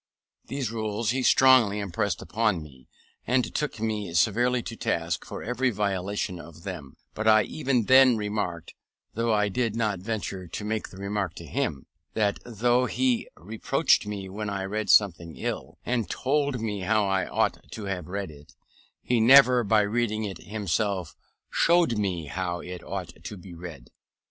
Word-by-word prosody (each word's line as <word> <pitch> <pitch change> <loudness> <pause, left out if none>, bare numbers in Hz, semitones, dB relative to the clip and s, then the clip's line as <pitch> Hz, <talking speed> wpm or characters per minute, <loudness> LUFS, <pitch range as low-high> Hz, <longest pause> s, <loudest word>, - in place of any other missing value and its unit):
These 135 -5 -3
rules 110 0 -1
he 130 +1 -1
strongly 130 -5 +5
impressed 100 -2 -2
upon 105 -2 0
me, 65 -4 -16 0.4
and 125 +1 +1
took 150 -6 -2
me 105 -5 -2
severely 120 +7 +2
to 115 - -6
task 85 -6 -2
for - - -7
every 125 +3 0
violation 100 -3 -2
of 85 0 -12
them: 80 -9 -7 0.2
but 110 +1 -3
I 110 -1 +6
even 135 -4 0
then 130 0 +6
remarked 105 -6 -3 0.4
(though 115 +1 0
I 105 -1 +3
did 115 +2 -1
not 105 -5 0
venture 100 -2 -4
to 105 +5 -6
make 110 0 -2
the 95 - -13
remark 100 -3 -3
to 85 - -9
him) 115 - -2 0.3
that 105 -2 +1
though 120 +2 +1
he 255 -3 0
reproached 105 +3 +1
me 100 -2 -5
when 105 +2 -5
I 100 -1 -3
read 105 +3 -3
a - - -8
sentence 85 -5 +3
ill, - - -4
and 120 -3 -1
told 140 -1 0
me 105 -2 -3
how 105 +3 +2
I 95 -1 0
ought - - -1
to 110 - -6
have 90 -4 -4
read 95 -2 -4
it, 75 0 -16 0.5
he 120 -1 +1
never 125 +1 +7
by 105 0 +4
reading 110 +1 0
it 100 -3 -5
himself, 100 -3 -2 0.4
showed 170 -10 +3
me 90 -6 -1
how 85 +3 -3
it 90 0 -7
ought - - -7
to 105 - -6
be 90 0 -11
read. 85 -7 -10
105 Hz, 170 wpm, -26 LUFS, 95-115 Hz, 0.5 s, never